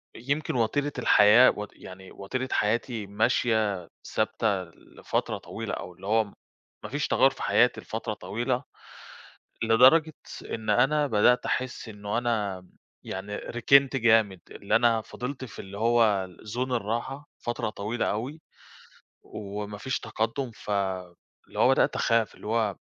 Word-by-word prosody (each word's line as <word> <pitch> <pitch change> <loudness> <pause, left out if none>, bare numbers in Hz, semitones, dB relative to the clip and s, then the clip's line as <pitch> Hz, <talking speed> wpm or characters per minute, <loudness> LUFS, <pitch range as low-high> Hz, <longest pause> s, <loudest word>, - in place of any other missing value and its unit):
يمكن 140 +6 -2
وتيرة 140 +5 0
الحياة 105 +4 +7
و 105 0 -4
يعني 95 0 -12
وتيرة 130 +7 -4
حياتي 110 0 0
ماشية 105 -3 +1 0.3
ثابتة 100 -4 0
لفترة 85 -2 -4
طويلة - - -6
أو 90 - -6
اللي 95 +3 -11
هو 110 +2 +3 0.6
ما - - -6
فيش - - -1
تغير - - +4
في - - -8
حياتي - - +3
لفترة - - -4
طويلة، 120 +4 -2 1.0
لدرجة 130 +8 +5 0.4
إن 110 -1 -4
أنا 135 +7 +3
بدأت 120 +1 +3
أحس 130 -2 -3
إنه 105 +1 -4
أنا 105 -6 -2 0.4
يعني 100 +2 -5
ركنت 135 +5 +3
جامد 110 -5 +3
اللي 100 - -1
أنا 115 -1 +4
فضلت 130 +4 -6
في 120 - -12
اللي 95 +1 -8
هو 110 -4 +3 0.3
zone 130 +1 -2
الراحة 120 +5 -3
فترة 120 -2 -3
طويلة 105 +3 -3
أوي، 130 +9 -4 0.8
وما 105 0 -6
فيش 130 +5 -2
تقدم 115 +3 -3
ف 105 - -13 0.8
اللي - - -8
هو - - +5
بدأت - - +3
أخاف 115 -1 +1
اللي - - -11
هو 110 -3 0
115 Hz, 135 wpm, -27 LUFS, 105-125 Hz, 1.0 s, الحياة